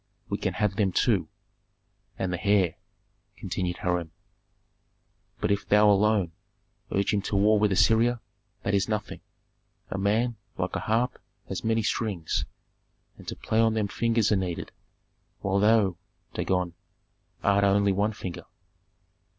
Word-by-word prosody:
"We - - -2
can - - -2
have 105 -2 0
them 100 -3 +2
too." - - +2 0.9
"And 95 -1 -2
the 90 - -4
heir," 100 -5 +3 0.6
continued 90 -1 -3
Hiram. 90 -3 -1 1.3
"But - - 0
if 100 0 -1
thou 105 0 +6
alone 100 -3 +2 0.6
urge 100 +1 +1
him 100 - +1
to 100 - -3
war 105 +2 +4
with 105 -1 +2
Assyria, 115 +5 +3 0.4
that 100 - -1
is 100 +1 +1
nothing. 105 -1 -3 0.7
A 100 - -2
man, 110 +4 +1 0.2
like - - -2
a - - 0
harp, 120 +3 0 0.3
has - - -4
many 115 0 +1
strings, 100 -7 -1 0.7
and - - -13
to - - -4
play 110 - -1
on 110 -1 +3
them 105 -2 0
fingers 115 +1 +1
are - - +4
needed, 90 -3 -3 0.7
while 100 0 +1
thou, 105 -4 +3 0.4
Dagon, 90 -2 -1 0.7
art 100 0 +3
only 100 0 +3
one 105 +3 +1
finger." 90 -4 -7
100 Hz, 140 wpm, -27 LUFS, 95-110 Hz, 1.3 s, thou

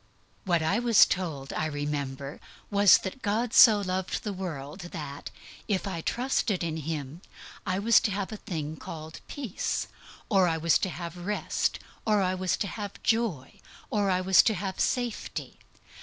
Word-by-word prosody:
What 170 -3 +2
I 195 +8 +2
was 235 -3 +6
told, 155 -7 -3
I 155 - -1
remember, 145 -2 -4 0.3
was, 200 -1 +7
that 195 +7 -6
God 220 +3 0
so 220 -4 +8
loved 185 -1 -2
the 210 - -3
world 160 -4 -6
that, 145 -5 -7 0.4
if 200 -2 0
I 180 -4 -3
trusted 240 -4 0
in 160 -1 -2
Him, 155 0 -5 0.5
I 185 -1 +1
was 220 +3 +5
to 210 - -1
have 195 +1 -3
a 215 - -5
thing 160 -7 -5
called 160 0 -8
peace, 260 -10 -3 0.4
or 195 -5 +4
I 165 -1 +1
was 165 0 +3
to 190 - -1
have 170 0 -6
rest, 200 +4 -1 0.3
or 215 -2 +3
I 185 0 +1
was 185 -1 0
to 200 - -2
have 205 +1 -7
joy, 220 - 0 0.3
or 205 -2 +1
I 185 -1 +2
was 190 0 +6
to 220 - +1
have 190 0 -4
safety. 245 -3 -2
185 Hz, 170 wpm, -28 LUFS, 160-205 Hz, 0.5 s, so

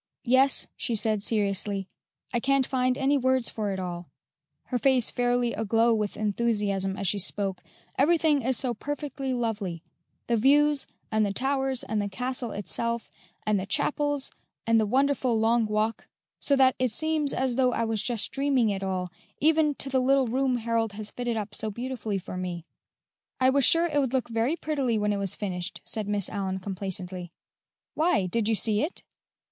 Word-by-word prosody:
"Yes," 260 +2 +4
she 235 - -2
said 215 -1 +1
seriously; 200 -2 0 0.5
"I 240 - +2
can't 275 +1 +2
find 255 -1 0
any 280 +1 +2
words 260 -1 +1
for 210 -2 -2
it 190 - -3
all" 175 -2 -5 0.6
her 250 - -2
face 260 -2 +4
fairly 245 -1 +1
aglow 225 +2 +2
with 210 -2 -2
enthusiasm 205 -3 0
as 195 - -2
she 200 +3 +1
spoke 195 0 +1 0.4
"everything 305 -1 +3
is 255 0 0
so 250 -1 -1
perfectly 280 +1 -4
lovely: 210 -9 -2 0.4
the 235 - +1
views, 285 +4 +4 0.2
and 215 0 +2
the 200 - 0
towers, 265 +2 0
and 215 -1 -1
the 205 - -3
castle 250 +4 -3
itself, 235 +3 -3 0.3
and 215 -2 +2
the 190 - -5
chapels, 290 +5 0 0.3
and 230 0 +4
the 215 - +1
wonderful 260 -1 +2
Long 225 0 +2
Walk, 215 +1 -1 0.3
so 280 - +2
that 260 -1 +5
it 255 -1 +2
seems 310 +4 +1
as 260 -2 -1
though 255 -1 +3
I 230 - -1
was 225 -2 -1
just 230 -4 -1
dreaming 270 -5 +2
it 195 -1 -3
all, 185 -1 -2 0.3
even 310 -1 +3
to 275 - -3
the 265 -1 +1
little 270 +1 +3
room 255 +1 +1
Harold 230 -2 -1
has 210 0 -6
fitted 240 -2 -3
up 210 -1 -4
so 220 -1 -1
beautifully 230 -2 -4
for 185 -1 -7
me." 180 -2 -4 0.8
"I 260 0 +4
was 275 -1 +4
sure 335 +1 +6
it 300 -4 +1
would 265 -2 0
look 260 -2 0
very 230 +7 0
prettily 275 -8 -1
when 210 0 +1
it - - -1
was 195 -2 0
finished," 180 -3 -4
said 215 -2 -3
Miss 205 -2 0
Allyn 190 -2 -3
complacently. 185 -2 -3 0.6
"Why, 305 - +2
did 210 +4 -1
you 225 - +3
see 215 0 +2
it?" 310 +6 -4
230 Hz, 180 wpm, -27 LUFS, 205-265 Hz, 0.8 s, sure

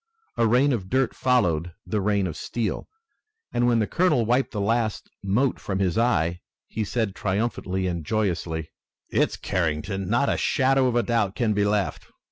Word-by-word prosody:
A 115 - +2
rain 130 +5 +4
of 95 -6 -3
dirt 130 0 +1
followed 90 -10 +1
the 105 -2 -1
rain 100 -1 +1
of 85 - -4
steel, 115 -3 -3 0.6
and, 120 0 +2
when 120 -1 +3
the 110 - +2
colonel 150 - +2
wiped 125 +4 +2
the 105 - -4
last 110 +1 -1
mote 115 +7 +1
from 95 - -3
his 95 -2 0
eye, 90 -8 +1 0.3
he 110 - -3
said 110 -1 -1
triumphantly 95 -2 -2
and 85 -3 -2
joyously: 85 -5 -2 0.4
"It's - - +1
Carrington! 90 +2 -2
Not 120 +5 +2
a - - +1
shadow 135 0 +2
of 120 -1 +1
doubt 115 -5 0
can 115 -3 +1
be 100 0 +1
left! 100 -1 -1
105 Hz, 170 wpm, -25 LUFS, 95-120 Hz, 0.6 s, rain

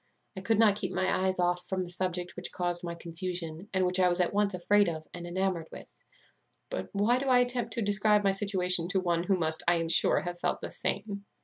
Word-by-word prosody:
I 190 - -6
could 215 +3 +1
not 210 -2 +4
keep 190 -3 -3
my 185 0 0
eyes 185 - 0
off 180 0 0
from 185 -1 -2
the 175 -1 -3
object 180 -1 -2
which 180 - -4
caused 175 -1 -2
my 170 -1 -4
confusion, 170 +1 -6
and 190 -1 +1
which 180 +1 +2
I 180 -1 +4
was 175 +1 0
at 180 - +1
once 205 -1 +1
afraid 205 +2 +3
of 155 -1 -6
and 175 0 -7
enamoured 180 -2 -1
with. - - -12 0.8
But - - -4
why 215 +5 +2
do 275 - -3
I 255 -1 +5
attempt 245 -2 0
to 230 - -2
describe 205 +1 +3
my 195 - +3
situation 185 -3 +1
to 195 +1 +1
one 175 -2 0
who 195 -1 +2
must, 160 -2 0
I 175 - +5
am 165 -1 -2
sure, - - +4
have 175 0 -6
felt - - -1
the - - -7
same?" 200 0 -4
185 Hz, 235 wpm, -29 LUFS, 175-205 Hz, 0.8 s, I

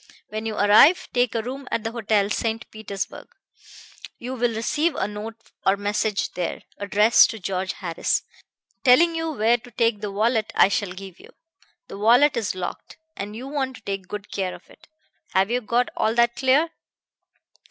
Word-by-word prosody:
When 215 +1 -4
you 220 - -3
arrive, 210 - +6
take 245 -2 +1
a 225 - 0
room 265 +3 -6
at 225 - -2
the 225 - -3
Hotel 215 -3 +1
St. 225 0 -2
Petersburg. 210 -3 -6 0.9
You 250 +2 -6
will 240 -2 0
receive 300 +8 0
a 190 - -1
note 210 +2 -7 0.3
or 195 +1 +3
message 205 +1 -1
there, 180 -2 -4 0.2
addressed 210 +3 +5
to 225 - -6
George 190 0 -2
Harris, 170 -3 -1 0.6
telling 315 +7 +6
you 325 0 -2
where 235 -3 +2
to 240 +1 -15
take 230 -3 0
the 210 -1 -4
wallet 220 +2 0
I - - +6
shall 200 -3 -1
give 190 -1 -10
you. - - -15 0.6
The - - -9
wallet 245 +7 +5
is 220 -5 -2
locked, 185 -1 -6 0.2
and 205 +1 -6
you 250 +4 -7
want 270 -2 -2
to - - -14
take 195 -2 -4
good 210 +1 -7
care 185 -2 -2
of - - -17
it. 310 - -20 0.5
Have 190 +3 +3
you 250 +1 +1
got 240 +2 +1
all 220 +1 0
that 235 0 +3
clear?' 275 +5 +2
220 Hz, 180 wpm, -23 LUFS, 205-245 Hz, 0.9 s, arrive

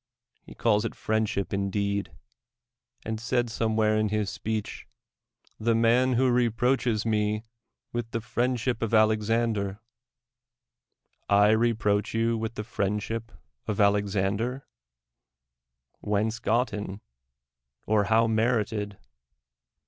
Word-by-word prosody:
He - - -14
calls 105 -2 +2
it 115 - -4
friendship 110 -3 -1
indeed; 100 -1 -1 0.9
and 110 0 -3
said 120 +1 0
somewhere 110 -1 +1
in 110 0 +1
his 105 -2 -1
speech 110 0 -4 0.4
— - - -62 0.3
"the 115 +1 +2
man 120 +3 +3
who 125 +1 +3
reproaches 120 -1 +1
me 105 -1 0 0.5
with 120 -1 -3
the 115 - -2
friendship 120 +1 -1
of 115 -1 -2
Alexan 110 +2 +3
der." 100 -1 -3 1.5
I 100 +1 +5
reproach 110 -2 +1
you 115 +1 +2
with 110 0 -4
friendship 110 +1 -2 0.4
of 105 -1 -2
Alex 100 0 +2
ander! 110 +7 -1 1.3
Whence 110 +3 -1
gotten, 105 -3 -1 0.8
or 105 -1 +2
how 110 +2 +4
merited? 110 -3 0
110 Hz, 110 wpm, -27 LUFS, 105-115 Hz, 1.5 s, I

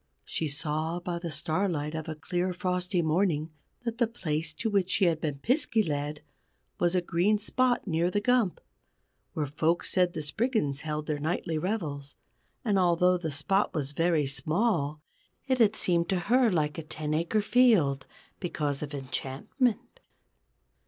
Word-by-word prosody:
She 160 - -2
saw, 155 +3 -2
by 175 -1 -4
the 170 -1 -4
starlight 155 -1 -1
of 160 0 -4
a 155 - -4
clear 180 +4 -2
frosty 180 -1 -1
morning, 160 -1 +1 0.3
that 230 -1 -4
the 235 - +4
place 160 -8 -2
to 230 +7 -3
which 200 -4 +1
she 195 - +3
had 165 -2 +1
been 150 -3 -2
Piskey 230 - +2
led 150 0 -3 0.6
was 175 +1 +2
a 180 - +3
green 175 +5 +2
spot 245 +4 +1
near 170 -2 +1
the 205 - +1
Gump, 230 -3 +2 0.7
where 150 - -1
folks 160 +4 0
said 180 -2 +2
the 155 - -3
Spriggans 150 - 0
held 150 -1 -3
their 150 -1 -2
nightly 160 +1 -1
revels. 150 -7 -3 0.5
And 205 -4 +3
although 180 0 +4
the 165 -2 -3
spot 185 +8 0
was 145 -3 -1
very 165 -1 +2
small, 150 - 0 0.4
it 260 -2 +1
had 220 -2 +5
seemed 170 -4 +1
to 190 - +1
her 245 +5 +4
like 155 -2 0
a - - -5
ten 155 0 -4
acre 170 +7 +1
field 205 - +3 0.3
because 150 -6 -2
of 150 -1 -5
enchantment. 140 - -2
170 Hz, 160 wpm, -28 LUFS, 150-200 Hz, 0.7 s, had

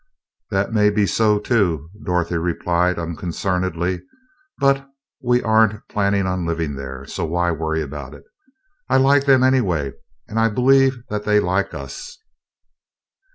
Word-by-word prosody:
"That 100 +1 -1
may 105 -1 +4
be 105 0 +2
so, 105 +1 +2
too," 90 - 0
Dorothy 90 -2 -1
replied, 90 +1 0
unconcernedly, 90 +1 -2 0.6
"but 140 0 +1 0.3
we 125 -1 +2
aren't 110 -1 +2
planning 100 -1 +1
on 90 -1 -1
living 85 -3 -2
there, 65 -1 -7
so - - -5
why 85 +2 0
worry 80 0 -2
about 70 -1 -8
it? - - -15 0.7
I 130 - +4
like 135 +1 +4
them, 135 -2 +5
anyway, 95 - +2 0.4
and 110 +1 -2
I 115 0 +3
believe 135 +3 +3
that 105 0 -3
they 105 0 +3
like 95 -2 -1
us." 70 -2 -8
95 Hz, 140 wpm, -21 LUFS, 85-110 Hz, 0.7 s, them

